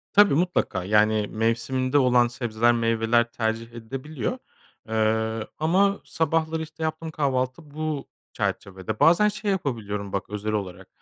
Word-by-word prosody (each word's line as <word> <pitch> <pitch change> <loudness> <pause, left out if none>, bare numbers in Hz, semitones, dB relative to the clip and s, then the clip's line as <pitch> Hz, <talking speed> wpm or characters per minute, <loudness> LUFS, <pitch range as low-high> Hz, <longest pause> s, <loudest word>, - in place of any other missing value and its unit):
Tabii, 205 -5 +6
mutlaka, 160 - 0
yani, 105 +1 +3
mevsiminde 115 +5 0
olan 125 -3 +4
sebzeler 120 -1 +1
meyveler 115 0 +2
tercih 115 0 -2
edilebiliyor. 130 +3 -4 0.5
Eee, 110 0 0
ama 195 +6 +2
sabahları 160 0 0
işte 160 0 -8
yaptığım 160 +1 -3
kahvaltı 140 +1 -1
bu 155 -2 -3 0.3
çerçevede. 100 +2 -3
Bazen 175 +6 +6
şey 210 0 -1
yapabiliyorum 105 - -3
bak 100 - -3
özel 105 +1 -3
olarak. 95 -3 -4
120 Hz, 125 wpm, -25 LUFS, 110-155 Hz, 0.5 s, Tabii